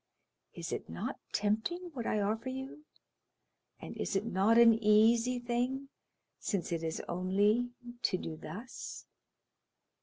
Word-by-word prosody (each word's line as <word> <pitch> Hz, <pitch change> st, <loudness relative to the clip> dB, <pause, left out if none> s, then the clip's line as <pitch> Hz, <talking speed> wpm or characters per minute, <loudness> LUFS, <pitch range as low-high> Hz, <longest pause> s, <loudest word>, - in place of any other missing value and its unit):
Is -, -, -5 dB
it -, -, -4 dB
not 80 Hz, +1 st, -4 dB
tempting 230 Hz, -, -1 dB
what 240 Hz, -4 st, -4 dB
I 210 Hz, -, +1 dB
offer 220 Hz, +5 st, -1 dB
you, 265 Hz, +3 st, -7 dB, 0.9 s
and -, -, -8 dB
is -, -, -2 dB
it 195 Hz, +3 st, +1 dB
not 220 Hz, +1 st, +3 dB
an 235 Hz, -1 st, +9 dB
easy 230 Hz, +4 st, +5 dB
thing, 245 Hz, +3 st, -1 dB, 0.5 s
since 190 Hz, -6 st, -2 dB
it 165 Hz, -1 st, -1 dB
is 160 Hz, -1 st, -3 dB
only 205 Hz, +7 st, +2 dB, 0.3 s
to 185 Hz, -, +2 dB
do 160 Hz, -3 st, -5 dB
thus? 205 Hz, +11 st, -8 dB
225 Hz, 130 wpm, -33 LUFS, 195-245 Hz, 0.9 s, an